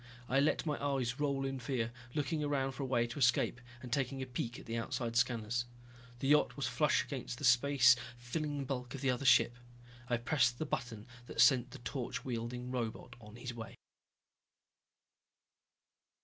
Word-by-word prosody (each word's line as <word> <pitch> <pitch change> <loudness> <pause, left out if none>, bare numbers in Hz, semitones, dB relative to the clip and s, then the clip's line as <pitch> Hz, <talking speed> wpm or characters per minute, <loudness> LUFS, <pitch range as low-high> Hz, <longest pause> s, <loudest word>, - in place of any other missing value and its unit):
I 135 - +3
let 145 +4 +2
my 150 -2 -2
eyes 135 -2 -1
roll 140 -2 0
in 135 -1 -3
fear, 120 -3 -2 0.2
looking 150 +1 0
around 140 -2 0
for 130 - -7
a 135 - -2
way 120 -2 +2
to 120 +4 -6
escape 120 -1 +2 0.2
and 120 -2 -5
taking 135 -1 0
a 130 - -3
peek 125 -1 -4
at - - -11
the 115 - -4
outside 115 0 -2
scanners. 120 0 +1 0.6
The 135 - 0
yacht 150 0 +4
was - - -1
flush - - +2
against 120 - -5
the - - -9
space 125 0 +6 0.2
filling 145 +3 -3
bulk 125 -1 -4
of 135 - -7
the 135 -2 +2
other 125 +2 -3
ship. 120 -2 +5 0.5
I 120 - +2
pressed 120 -1 +2
the 155 - -2
button 115 -7 -4 0.2
that - - -7
sent 125 +1 +6
the - - -9
torch 125 0 -4
wielding 125 0 -4
robot 120 0 -4
on 105 0 -12
his 120 +1 -6
way. 115 -1 -8
125 Hz, 175 wpm, -34 LUFS, 120-135 Hz, 0.6 s, space